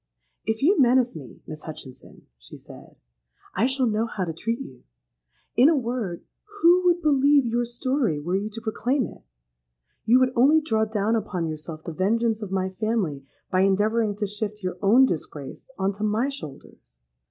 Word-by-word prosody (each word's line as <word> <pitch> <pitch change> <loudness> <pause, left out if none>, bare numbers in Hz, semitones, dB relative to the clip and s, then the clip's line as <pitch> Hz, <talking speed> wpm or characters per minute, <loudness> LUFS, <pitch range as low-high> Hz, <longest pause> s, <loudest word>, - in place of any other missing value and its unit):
'—'If 220 +2 -1
you 360 +1 +4
menace 250 -2 +3
me, 140 -6 -11
Miss 155 -1 -8
Hutchinson,' 140 -5 -11
she - - -12
said, - - -14 0.6
'I 215 +7 +2
shall 265 -1 +1
know 225 0 0
how 195 -4 -3
to 165 - -4
treat 230 +8 -3
you. 130 - -10 0.7
In 255 +5 +6
a 325 - +3
word, 235 -8 -3 0.4
who 355 +2 +5
would 350 -1 +3
believe 285 -2 +4
your 240 +1 0
story 240 - -1
were 175 +5 -2
you 205 +2 -1
to 225 +2 -8
proclaim 245 +4 -1
it? - - -11 0.8
You 245 +3 +5
would 255 0 +2
only 280 +6 +5
draw 220 -8 0
down 215 +1 0
upon 195 -6 -2
yourself 155 0 -7
the 165 - -6
vengeance 220 +5 0
of 210 - -5
my 190 -1 0
family 185 -10 -2 0.2
by 185 - +3
endeavouring 205 +2 +2
to 205 0 -2
shift 210 0 -5
your 180 -1 -4
own 230 +7 +6
disgrace 150 - -6
on 190 0 0
to 205 +2 -7
my 215 +5 +1
shoulders. 135 - -11
220 Hz, 175 wpm, -24 LUFS, 185-250 Hz, 0.8 s, In